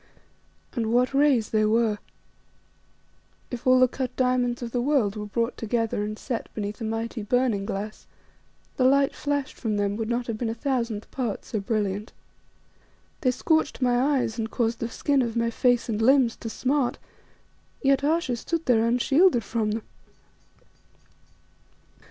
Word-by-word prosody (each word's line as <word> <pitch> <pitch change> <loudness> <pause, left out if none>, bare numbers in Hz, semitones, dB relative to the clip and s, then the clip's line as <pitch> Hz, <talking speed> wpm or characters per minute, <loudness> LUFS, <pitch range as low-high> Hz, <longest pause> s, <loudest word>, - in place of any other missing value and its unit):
And 225 -3 -1
what 250 +3 +2
rays 275 -6 +3
they 215 -1 +3
were! 215 -1 +2 1.5
If 245 0 -5
all 255 0 +6
the 255 - +6
cut 260 0 -4
diamonds 250 -1 +1
of 235 - -5
the 245 - 0
world 250 -7 +1
were 210 -1 -5
brought 230 +3 -1
together 225 -2 -1
and 215 +1 -4
set 240 -2 -4
beneath 210 +1 -4
a - - -2
mighty 225 +1 -3
burning 210 -2 +1
glass, 210 +2 -5 0.7
the 255 - +2
light 275 +1 +4
flashed 285 -2 -2
from 215 -4 -1
them 200 0 0
would 225 -1 -3
not 240 0 -1
have 225 -2 -4
been 235 - -1
a 225 - -3
thousandth 235 -4 -2
part 240 -6 -3
so 215 - -3
brilliant. 205 0 -2 1.1
They 255 - +3
scorched 315 +5 +1
my 255 +3 +2
eyes 230 -2 -2
and 220 0 -2
caused 230 0 -1
the 230 - -3
skin 280 +3 +1
of 235 -2 -2
my 230 0 +1
face 245 0 +2
and 220 -2 -2
limbs 255 -1 +4
to 225 - -6
smart, 260 +2 0 0.9
yet 275 0 +3
Ayesha 300 -5 +1
stood 330 +7 -3
there 230 -3 +4
unshielded 260 +3 +3
from 220 +1 -1
them. 215 +1 -2
235 Hz, 160 wpm, -25 LUFS, 220-260 Hz, 1.5 s, all